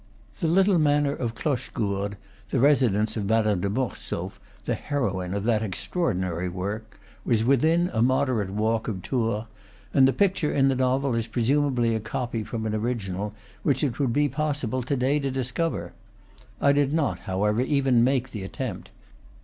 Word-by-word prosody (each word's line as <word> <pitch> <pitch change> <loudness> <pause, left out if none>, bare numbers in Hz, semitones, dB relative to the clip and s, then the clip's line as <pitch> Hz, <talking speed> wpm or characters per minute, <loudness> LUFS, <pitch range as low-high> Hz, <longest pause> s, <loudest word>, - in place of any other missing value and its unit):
The 165 - 0
little 190 +2 +4
manor 145 -1 +3
of 115 -5 -3
Cloche 130 0 -2
gourde, 100 -1 -2 0.3
the 130 - 0
residence 115 -6 +3
of 105 -3 -2
Madame 105 -3 +2
de 100 - 0
Mortsauf, 100 -5 -3 0.3
the 120 - 0
heroine 100 -8 -2
of 100 - -2
that 110 -1 +2
extraordinary 95 - -2
work, 100 +5 -5 0.2
was 115 -3 +2
within 160 +8 +3
a 110 - +1
moderate 130 -5 +2
walk 110 +3 0
of 95 -4 -4
Tours, 115 -4 -1 0.5
and 135 -2 +6
the - - +4
picture 190 -3 +1
in 135 -1 +3
the 135 - +1
novel 130 +1 +1
is 115 -1 -1
presumably 125 0 +1
a 110 - 0
copy 115 +1 -3
from 110 0 -4
an 110 - -1
original 105 -3 -2 0.3
which 130 +4 +1
it 135 -4 -1
would 135 -4 +1
be 145 +4 +2
possible 140 -3 -2
to 130 +4 -1
day 135 +3 +1
to 140 -1 -1
discover. 130 +5 -2 0.7
I 140 - +4
did 145 0 +2
not, 155 -3 0
however, 105 +4 +1
even 130 -3 +3
make 130 0 +1
the 105 - -5
attempt. 95 +1 -5
120 Hz, 170 wpm, -26 LUFS, 105-140 Hz, 0.7 s, and